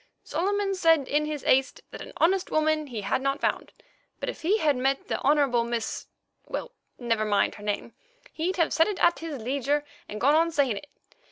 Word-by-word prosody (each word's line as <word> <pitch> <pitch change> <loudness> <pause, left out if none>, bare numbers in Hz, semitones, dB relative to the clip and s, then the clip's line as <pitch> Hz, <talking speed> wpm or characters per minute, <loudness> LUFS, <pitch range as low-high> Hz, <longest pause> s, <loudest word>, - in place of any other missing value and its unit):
Solomon 395 +5 -1
said 325 -7 +3
in 300 +1 +1
his 300 -3 -4
haste 265 +1 +2
that - - -8
an - - -9
honest 365 +3 +2
woman 310 -1 +1
he 235 -5 -5
had 200 +6 -1
not 275 +1 0
found, - - -1 0.5
but - - -3
if - - -7
he 380 +7 +2
had 300 -8 +2
met 270 +2 -1
the - - -2
Honourable 275 -5 +3
Miss—well, 235 - -6 0.3
never 230 -3 0
mind 205 -2 +1
her 205 - -12
name—he'd 340 - -5
have 335 -3 +2
said 325 - +4
it 415 -3 -2
at 345 0 +3
his 315 -4 -5
leisure, 280 +5 -1 0.2
and 210 - -6
gone 280 +5 +4
on 330 +2 +4
saying 280 -9 +1
it. 290 - -9
290 Hz, 190 wpm, -26 LUFS, 250-330 Hz, 0.5 s, said